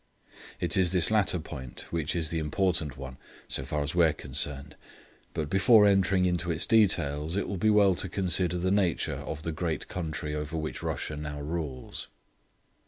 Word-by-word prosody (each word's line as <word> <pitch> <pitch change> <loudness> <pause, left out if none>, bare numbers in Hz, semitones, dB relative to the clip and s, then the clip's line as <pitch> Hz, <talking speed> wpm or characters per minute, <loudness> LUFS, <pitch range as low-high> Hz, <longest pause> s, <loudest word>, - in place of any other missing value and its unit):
It - - 0
is 95 -2 +4
this 90 +1 +3
latter 105 -4 +3
point 70 -6 -7
which 80 -2 -1
is 80 -2 0
the 85 - -1
important 80 -1 0
one, 65 -1 -8 0.3
so 65 - -1
far 75 +3 -2
as 75 - -4
we 85 -1 +5
are 80 - +2
concerned, 70 0 -1 0.6
but 75 - -2
before 105 - +5
entering 95 -2 +3
into 90 -1 0
its 80 -2 0
details, 85 -7 +2
it 100 - -1
will 100 - -3
be 110 - +3
well 105 -2 +5
to 95 +1 -2
consider 90 -1 +1
the 90 +2 0
nature 95 -4 +1
of 75 0 -6
the 80 - -2
great 80 -1 -3
country 80 -3 -4
over 75 +1 -4
which 80 -1 -4
Russia 75 - -3
now 75 -1 -6
rules. 75 -4 -5
85 Hz, 180 wpm, -28 LUFS, 75-95 Hz, 0.6 s, we